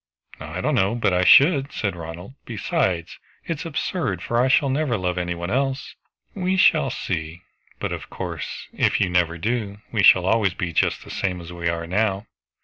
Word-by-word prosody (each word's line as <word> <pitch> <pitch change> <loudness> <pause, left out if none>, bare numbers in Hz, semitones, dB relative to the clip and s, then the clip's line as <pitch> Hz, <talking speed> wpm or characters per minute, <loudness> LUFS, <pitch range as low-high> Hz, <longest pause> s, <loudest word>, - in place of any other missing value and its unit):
"I - - -6
don't - - 0
know, 95 +5 +2
but 115 -5 +1
I 90 0 +2
should," 140 - +6
said 100 -4 -2
Ronald. 85 +7 -8
"Besides, 95 -6 -2 0.3
it 165 -3 -3
is 170 - -5
absurd, 145 - -2
for 120 0 +1
I 130 - +3
shall 140 0 +3
never 135 -4 0
love 90 -1 -1
any 90 -1 -2
one 85 +2 -5
else." 135 +1 -1 0.4
"We 190 -1 -1
shall - - +4
see; 80 0 -4 0.4
but - - -3
of - - -6
course - - -6
if - - +1
you 95 -3 +1
never 85 -1 +1
do, 105 +1 -2
we 110 - +1
shall 90 -1 +6
always 100 -2 +2
be 85 -2 -3
just - - +1
the - - -11
same 90 -2 -2
as 85 0 -9
we 85 -1 -2
are 85 0 -3
now." 100 +3 0
95 Hz, 195 wpm, -23 LUFS, 90-130 Hz, 0.4 s, should